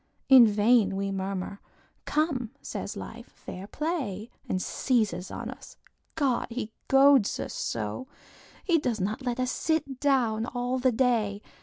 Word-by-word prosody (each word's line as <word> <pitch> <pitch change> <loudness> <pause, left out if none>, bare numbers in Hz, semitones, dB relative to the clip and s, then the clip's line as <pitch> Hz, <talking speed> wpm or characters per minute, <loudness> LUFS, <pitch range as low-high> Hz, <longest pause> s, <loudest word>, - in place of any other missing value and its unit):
In 255 -3 +9
vain 210 -1 +3
we 195 0 -2
murmur; 195 0 -4 0.4
"Come," 305 -3 +1
Life 245 +4 -9
says, - - -5 0.3
"Fair 190 +2 -9
play!" 250 - -3 0.2
And 185 - 0
seizes 200 -5 0
on - - -5
us. - - -13 0.4
God! 275 -6 +1
he 230 -2 -4 0.2
goads 270 -4 +5
us - - -4
so! 110 - -3 0.6
He 340 -3 +3
does 240 -6 -1
not 210 +6 -2
let 250 -1 -2
us 255 0 0
sit 290 -5 -1
down 240 -6 +1
all 250 +1 -2
the 255 0 +3
day. 220 -4 +1
240 Hz, 145 wpm, -28 LUFS, 200-265 Hz, 0.6 s, In